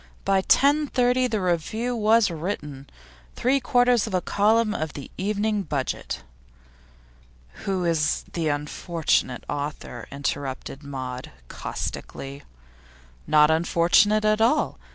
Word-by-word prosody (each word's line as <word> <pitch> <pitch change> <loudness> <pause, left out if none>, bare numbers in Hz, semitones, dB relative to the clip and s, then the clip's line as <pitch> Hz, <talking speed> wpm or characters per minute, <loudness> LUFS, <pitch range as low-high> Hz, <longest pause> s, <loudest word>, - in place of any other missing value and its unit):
By 195 -1 +3
10.30 255 -1 +3
the 215 -2 0
review 195 +7 -1
was 220 -2 +3
written 150 -5 -5 0.5
three 265 +3 +2
quarters 245 -3 +3
of 200 - -2
a - - +3
column 215 +4 +2
of 155 -1 -3
the 140 - -9
Evening 210 +2 0
Budget.' 145 -7 -3 1.4
'Who 190 -2 -1
is 160 -3 +1
the 165 -2 -1
unfortunate 150 -2 -1
author?' 145 -4 -5
interrupted 140 -1 -4
Maud, 130 -3 -6 0.2
caustically. 140 +1 -6 0.9
'Not 150 0 +5
unfortunate 175 +6 +3
at 215 +1 +3
all. 245 +7 +2
180 Hz, 110 wpm, -24 LUFS, 150-220 Hz, 1.4 s, Not